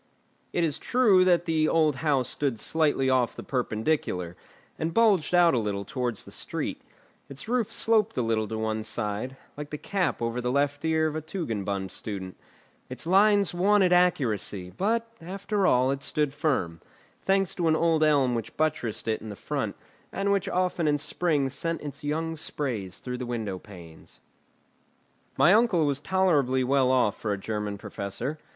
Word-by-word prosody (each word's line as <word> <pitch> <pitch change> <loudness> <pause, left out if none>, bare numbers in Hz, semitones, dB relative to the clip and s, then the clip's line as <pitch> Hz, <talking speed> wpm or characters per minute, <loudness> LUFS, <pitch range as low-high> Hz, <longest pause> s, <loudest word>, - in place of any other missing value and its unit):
It 175 - 0
is 155 -4 0
true 215 -7 +4
that 175 -1 +3
the 160 -2 +2
old 155 -4 +2
house 140 -5 +1
stood 135 -6 -2
slightly 150 -4 +1
off 130 -3 +2
the - - -8
perpendicular, 110 - -1 0.4
and 160 +1 -2
bulged 205 -7 +3
out 175 -1 +5
a 125 - +2
little 100 -2 -3
towards 125 -4 -3
the - - -11
street; - - -4 0.5
its 135 +4 -7
roof 240 -2 0
sloped 225 -1 +2
a 125 - +1
little 110 -1 0
to 110 +1 -4
one 110 0 -1
side, 110 +4 -3 0.2
like 150 0 -7
the 150 - -5
cap 190 +3 -1
over 115 +1 -2
the 125 0 -1
left 145 +1 0
ear 160 0 +2
of 155 -1 -1
a 155 - -2
Tugendbund 105 - -3
student; 95 -3 -5 0.5
its 130 +2 -5
lines 200 +2 +4
wanted 190 0 +3
accuracy; 110 - +1
but 230 - 0
after 195 +3 -1
all, 130 -3 +3
it 140 0 -3
stood 150 -1 0
firm, 130 - -1 0.4
thanks 195 -1 +1
to 170 -2 -1
an 160 - +4
old 165 -1 +2
elm 140 -5 +3
which 115 -1 -5
buttressed 130 -9 -1
it 110 -1 0
in 105 -1 -7
front, - - -3 0.4
and 200 +1 -1
which 200 -2 +1
often 180 -3 0
in 145 0 +3
spring 150 -1 0
sent 165 +4 -3
its 145 -1 -7
young 160 +2 -2
sprays 120 - -4
through 125 -1 -5
the 125 - -4
window 110 -6 -3
panes. 85 -6 -14 1.2
My 155 +8 +6
uncle 210 -8 +4
was 140 -1 0
tolerably 150 -7 +2
well 130 0 +2
off 125 -5 +2
for 110 - -1
a - - -3
German 105 0 -4
professor. 105 +11 -5
145 Hz, 170 wpm, -27 LUFS, 115-170 Hz, 1.2 s, My